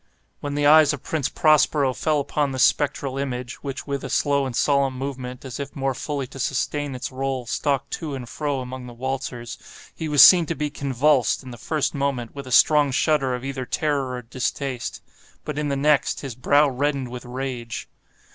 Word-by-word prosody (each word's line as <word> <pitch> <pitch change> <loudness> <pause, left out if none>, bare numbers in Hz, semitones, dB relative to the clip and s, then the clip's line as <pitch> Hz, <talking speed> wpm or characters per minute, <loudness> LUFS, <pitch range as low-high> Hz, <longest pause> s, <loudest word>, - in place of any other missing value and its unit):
When 145 0 -4
the 145 0 +1
eyes 155 0 +7
of 145 - -7
Prince 155 -5 -1
Prospero 150 -3 +3
fell 155 +3 0
upon 145 0 -1
this 130 - +2
spectral 135 -2 +1
image 125 -3 -4
(which 135 -2 -5
with 140 -2 -3
a 135 - -5
slow 140 +1 +1
and 125 - -5
solemn 140 -1 +2
movement, 130 -1 -6
as 130 0 -6
if 140 0 -6
more 135 -1 -1
fully 140 +1 -3
to 135 - -11
sustain 140 +1 -1
its 130 +2 -5
role, 130 -1 -3
stalked 140 +3 -1
to 150 -4 -4
and 125 -3 -7
fro 145 0 -2
among 125 0 -7
the 120 - -10
waltzers) 125 -1 -4 0.3
he 160 -2 -5
was 145 -2 +8
seen 175 -4 +7
to 165 - -2
be 150 -1 -2
convulsed, 140 -1 +1
in 130 - -9
the - - -8
first 150 +6 -1
moment 140 -4 -2
with 140 -2 -8
a - - -8
strong 150 +2 +5
shudder 135 -1 +1
either 135 +1 -5
of 125 - -7
terror 140 -4 0
or 125 -1 -5
distaste; 125 +1 -4 0.4
but, 150 0 -3
in 150 -1 -1
the 140 - 0
next, 145 +1 +2
his 135 -4 -5
brow 145 +5 +3
reddened 135 -1 -1
with 125 -1 -7
rage. 125 -2 -5
135 Hz, 200 wpm, -23 LUFS, 130-145 Hz, 0.4 s, was